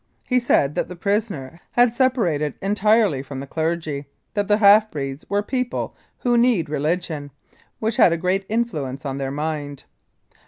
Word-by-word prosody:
He 250 Hz, -1 st, +2 dB
said 150 Hz, -, +2 dB
that -, -, -1 dB
the 180 Hz, -, -8 dB
prisoner 185 Hz, -, -2 dB
had 245 Hz, -1 st, +4 dB
separated 195 Hz, -, +1 dB
entirely 205 Hz, -, +2 dB
from 135 Hz, 0 st, -7 dB
the 135 Hz, -, -5 dB
clergy: 160 Hz, -2 st, -2 dB, 0.3 s
that 205 Hz, -2 st, -1 dB
the 210 Hz, -, +4 dB
half 215 Hz, +1 st, +6 dB
breeds 135 Hz, -3 st, -5 dB
were 205 Hz, +1 st, +1 dB
people 250 Hz, +2 st, -2 dB, 0.3 s
who 240 Hz, -1 st, +3 dB
need 230 Hz, -11 st, +2 dB
religion, 155 Hz, 0 st, -2 dB, 0.5 s
which 220 Hz, 0 st, -1 dB
had -, -, +6 dB
a 170 Hz, -, +1 dB
great 185 Hz, +3 st, 0 dB
influence 155 Hz, -, -2 dB
on 135 Hz, 0 st, -3 dB
their 135 Hz, -1 st, -2 dB
mind. 145 Hz, -1 st, -4 dB
170 Hz, 160 wpm, -22 LUFS, 145-215 Hz, 0.5 s, half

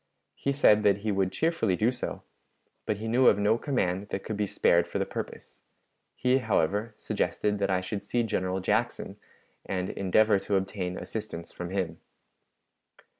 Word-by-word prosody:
He 140 Hz, -, -2 dB
said 110 Hz, -7 st, +5 dB
that 100 Hz, -1 st, +3 dB
he 110 Hz, -, +2 dB
would 95 Hz, -2 st, +1 dB
cheerfully 155 Hz, -, +1 dB
do 110 Hz, +6 st, +2 dB
so, 125 Hz, -, -5 dB, 0.6 s
but 105 Hz, -, 0 dB
he 110 Hz, +2 st, -5 dB
knew 125 Hz, +3 st, +4 dB
of 100 Hz, -, +6 dB
no 105 Hz, +3 st, +2 dB
command 100 Hz, -, -1 dB
that 95 Hz, -, -3 dB
could 110 Hz, -, -4 dB
be 105 Hz, 0 st, -1 dB
spared 85 Hz, -2 st, +3 dB
for -, -, -3 dB
the -, -, 0 dB
purpose; -, -, -7 dB, 0.5 s
he, 125 Hz, +1 st, +2 dB
however, 105 Hz, 0 st, 0 dB
suggested 105 Hz, -1 st, -1 dB
that 100 Hz, -, 0 dB
I 95 Hz, -1 st, +1 dB
should 100 Hz, +2 st, -4 dB
see 120 Hz, +4 st, 0 dB
General 95 Hz, -3 st, -1 dB
Jackson, -, -, -1 dB, 0.5 s
and 95 Hz, -1 st, -2 dB
endeavor 100 Hz, +2 st, +3 dB
to 100 Hz, -, -1 dB
obtain 95 Hz, -1 st, -2 dB
assistance 105 Hz, -6 st, -6 dB
from 90 Hz, -1 st, -6 dB
him. 90 Hz, -4 st, -2 dB
100 Hz, 170 wpm, -28 LUFS, 95-110 Hz, 0.6 s, of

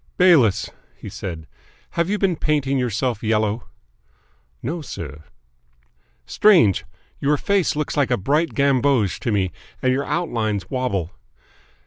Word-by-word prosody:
"Bayliss," 155 Hz, -, +4 dB, 0.3 s
he -, -, -9 dB
said, 80 Hz, -4 st, -6 dB, 0.5 s
"have 170 Hz, +1 st, 0 dB
you 210 Hz, -, +1 dB
been 195 Hz, -4 st, +1 dB
painting 140 Hz, -3 st, 0 dB
yourself 120 Hz, -1 st, -1 dB
yellow?" 110 Hz, 0 st, 0 dB, 1.0 s
"No, 165 Hz, +7 st, -3 dB
sir." 75 Hz, -, -8 dB, 1.0 s
"Strange! 170 Hz, -, +4 dB, 0.3 s
Your 145 Hz, +1 st, +2 dB
face 195 Hz, -1 st, +1 dB
looks 150 Hz, 0 st, -2 dB
a 130 Hz, -4 st, +2 dB
bright 150 Hz, -, 0 dB
gamboge 135 Hz, -6 st, +2 dB
to 115 Hz, -, -2 dB
me, 95 Hz, -3 st, 0 dB, 0.3 s
and 130 Hz, -1 st, +2 dB
your 140 Hz, +2 st, -1 dB
outlines 115 Hz, -, -2 dB
wobble. 110 Hz, -, -1 dB
130 Hz, 120 wpm, -22 LUFS, 105-150 Hz, 1.0 s, Bayliss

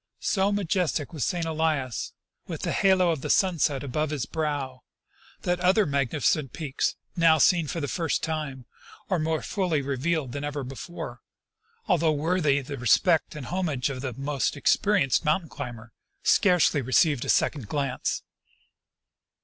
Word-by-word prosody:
So 195 Hz, 0 st, +2 dB
majestic 180 Hz, -6 st, -1 dB
was 150 Hz, -6 st, -2 dB
St. 175 Hz, -2 st, -1 dB
Elias, 155 Hz, -6 st, -1 dB, 0.3 s
with -, -, -6 dB
the -, -, -1 dB
halo 185 Hz, -3 st, +3 dB
of 155 Hz, -5 st, -3 dB
the -, -, -5 dB
sunset 160 Hz, -7 st, +2 dB
about 150 Hz, +3 st, -1 dB
his 145 Hz, -5 st, -2 dB
brow, 145 Hz, -5 st, -3 dB, 0.6 s
that 180 Hz, 0 st, 0 dB
other 190 Hz, +4 st, +4 dB
magnificent 140 Hz, -1 st, 0 dB
peaks 145 Hz, -5 st, -2 dB, 0.2 s
now 165 Hz, -2 st, +5 dB
seen 170 Hz, 0 st, +4 dB
for 165 Hz, -, -3 dB
the 145 Hz, -, -2 dB
first 165 Hz, +1 st, -1 dB
time 150 Hz, -6 st, -3 dB, 0.5 s
or 185 Hz, -, +2 dB
more 160 Hz, 0 st, -1 dB
fully 180 Hz, -7 st, 0 dB
re 135 Hz, 0 st, -2 dB
vealed 155 Hz, -2 st, -1 dB
than 145 Hz, +3 st, -5 dB
ever 145 Hz, -1 st, -3 dB
before, 135 Hz, +7 st, -7 dB, 0.7 s
although 170 Hz, -5 st, +3 dB
worthy 150 Hz, -2 st, +1 dB
the 140 Hz, +1 st, -7 dB
respect 155 Hz, -, +3 dB
and 145 Hz, -4 st, -6 dB
homage 155 Hz, -6 st, -1 dB
of 130 Hz, -1 st, -6 dB
the 130 Hz, -2 st, -4 dB
most 140 Hz, +2 st, -2 dB
experienced 195 Hz, -11 st, +2 dB
mountain 160 Hz, +1 st, +1 dB
climber, 120 Hz, -5 st, -8 dB, 0.3 s
scarcely 180 Hz, -6 st, +4 dB
received 130 Hz, +2 st, +2 dB
a -, -, -5 dB
second 135 Hz, -9 st, +1 dB
glance. 140 Hz, 0 st, -2 dB
150 Hz, 150 wpm, -26 LUFS, 135-170 Hz, 0.7 s, now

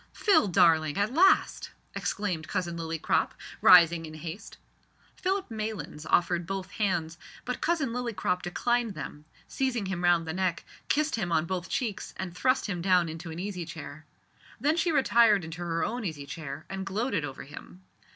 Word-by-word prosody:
"Phil, 400 Hz, -, +3 dB
darling, 160 Hz, -4 st, +4 dB
at 205 Hz, +4 st, 0 dB
last!" 380 Hz, +6 st, +3 dB, 0.2 s
exclaimed 180 Hz, -7 st, -2 dB
Cousin 175 Hz, -3 st, -2 dB
Lillycrop, 165 Hz, -1 st, 0 dB, 0.3 s
rising 170 Hz, -2 st, +7 dB
in 155 Hz, -, -10 dB
haste. 165 Hz, +5 st, -8 dB, 0.6 s
Philip 380 Hz, -5 st, -2 dB
Maylands 215 Hz, -8 st, -5 dB
offered 175 Hz, -1 st, +2 dB
both 190 Hz, -1 st, -4 dB
hands, 175 Hz, -6 st, -1 dB, 0.3 s
but 250 Hz, 0 st, -3 dB
Cousin 310 Hz, -4 st, +1 dB
Lillycrop 230 Hz, -7 st, -1 dB
declined 235 Hz, +4 st, 0 dB
them, 150 Hz, 0 st, -7 dB, 0.2 s
seized 260 Hz, -2 st, -1 dB
him 185 Hz, -2 st, -3 dB
round 175 Hz, -2 st, +3 dB
the 160 Hz, -, -2 dB
neck, 185 Hz, -1 st, -1 dB, 0.2 s
kissed 305 Hz, 0 st, +1 dB
him 185 Hz, -6 st, -2 dB
on 160 Hz, -1 st, +2 dB
both 180 Hz, 0 st, -4 dB
cheeks, 230 Hz, -6 st, -3 dB
and 185 Hz, -2 st, -5 dB
thrust 255 Hz, +7 st, +2 dB
him 180 Hz, -5 st, -3 dB
down 180 Hz, -2 st, +3 dB
into 165 Hz, +2 st, -7 dB
an 160 Hz, -, -7 dB
easy 185 Hz, -1 st, -4 dB
chair. 155 Hz, -2 st, -9 dB, 0.5 s
Then 295 Hz, +6 st, +2 dB
she 345 Hz, 0 st, +1 dB
retired 230 Hz, -, +4 dB
into 165 Hz, +2 st, -7 dB
her 165 Hz, -1 st, -1 dB
own 240 Hz, +1 st, -3 dB
easy 155 Hz, -7 st, -4 dB
chair 150 Hz, 0 st, -7 dB
and 195 Hz, 0 st, -5 dB
gloated 195 Hz, -, -1 dB
over 135 Hz, -2 st, -6 dB
him. 160 Hz, +6 st, -12 dB
180 Hz, 165 wpm, -28 LUFS, 165-225 Hz, 0.6 s, rising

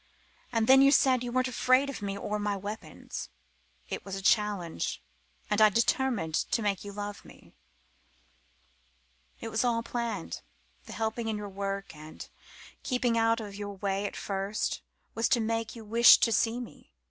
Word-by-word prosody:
And 230 Hz, -2 st, +1 dB
then 265 Hz, +3 st, +7 dB
you 275 Hz, 0 st, +6 dB
said 260 Hz, -3 st, +4 dB
you 245 Hz, -, -4 dB
weren't 255 Hz, +1 st, +1 dB
afraid 255 Hz, +2 st, +3 dB
of 275 Hz, -5 st, -6 dB
me 200 Hz, -1 st, -3 dB
or 210 Hz, +1 st, -3 dB
my 205 Hz, -1 st, -1 dB
weapons. 205 Hz, +3 st, -7 dB, 0.6 s
It -, -, -5 dB
was 195 Hz, -1 st, -6 dB
a 195 Hz, -, -5 dB
challenge. 200 Hz, -, +1 dB, 0.5 s
And 210 Hz, 0 st, +1 dB
I 215 Hz, -, +8 dB
determined 230 Hz, -, +1 dB
to 225 Hz, +7 st, 0 dB
make 200 Hz, -2 st, -1 dB
you 205 Hz, -, -7 dB
love 205 Hz, 0 st, -6 dB
me. -, -, -17 dB, 1.9 s
It 225 Hz, -, -4 dB
was 220 Hz, +2 st, 0 dB
all 235 Hz, -2 st, +1 dB
planned, 230 Hz, -, -4 dB, 0.5 s
the -, -, -8 dB
helping 225 Hz, +1 st, -2 dB
in 220 Hz, -1 st, -1 dB
your 205 Hz, -1 st, -6 dB
work 195 Hz, -2 st, -4 dB
and 155 Hz, +1 st, -10 dB, 0.5 s
keeping 250 Hz, -2 st, 0 dB
out 225 Hz, 0 st, +3 dB
of 210 Hz, -3 st, -7 dB
your 205 Hz, 0 st, -6 dB
way 195 Hz, +1 st, -1 dB
at -, -, -8 dB
first 195 Hz, +1 st, -2 dB, 0.3 s
was 225 Hz, +1 st, 0 dB
to 245 Hz, -, +3 dB
make 225 Hz, +1 st, -2 dB
you 225 Hz, -2 st, -10 dB
wish 235 Hz, +3 st, +8 dB
to 230 Hz, -, +2 dB
see 225 Hz, +2 st, +1 dB
me. 240 Hz, -, -11 dB
215 Hz, 170 wpm, -29 LUFS, 200-235 Hz, 1.9 s, I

